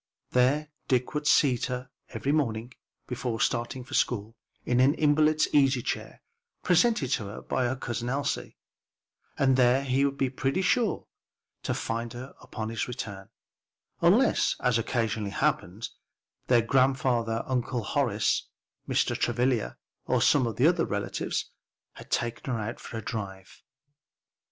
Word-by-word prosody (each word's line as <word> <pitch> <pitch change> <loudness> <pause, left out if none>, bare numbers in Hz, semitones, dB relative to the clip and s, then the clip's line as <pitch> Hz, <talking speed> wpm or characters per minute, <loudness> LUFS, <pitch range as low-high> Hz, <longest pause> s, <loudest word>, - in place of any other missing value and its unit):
There 140 +5 +2 0.2
Dick 125 -2 +1
would 150 0 -2
seat 135 -5 +4
her 125 0 -5 0.2
each - - -6
morning, 125 -5 0 0.3
before 120 -2 -3
starting 120 +2 -1
for 125 - -12
school, 115 -1 0 0.3
in 125 0 +2
an 135 +4 +5
invalid's 155 0 +3
easy 135 -4 +4
chair - - -4 0.4
presented 180 - +3
to 105 - 0
her 100 +2 -7
by 130 - 0
her 125 +2 0
Cousin 120 -2 -4
Elsie, 140 +2 -2 0.8
and 135 -1 +3
there 125 +1 +4
he 135 0 +1
would 140 0 0
be 135 -2 0
pretty 135 +8 -1
sure 225 +3 +1 0.6
to - - -2
find 115 +1 -3
her 130 +3 -8 0.2
on 110 0 -4
his 115 -1 -2
return, 100 -6 -6 0.7
unless, - - +4
as 125 -2 +2
occasionally 115 -3 -1
happened, 115 -4 -1 0.6
their 120 -2 +4
grandfather, 125 -2 +2
Uncle 125 -2 -1
Horace, 115 -4 0 0.4
Mr. - - +1
Travilla, 120 - 0 0.3
or - - +2
some 140 -4 +4
one 115 - -3
of 160 +7 +5
the 165 - +2
relatives, 100 0 -3 0.4
had - - -13
taken 120 +2 -2
her 115 - -1
out 110 +2 -4
for 115 - -7
a 110 - -5
drive. 95 -4 -6
125 Hz, 145 wpm, -28 LUFS, 115-135 Hz, 0.8 s, an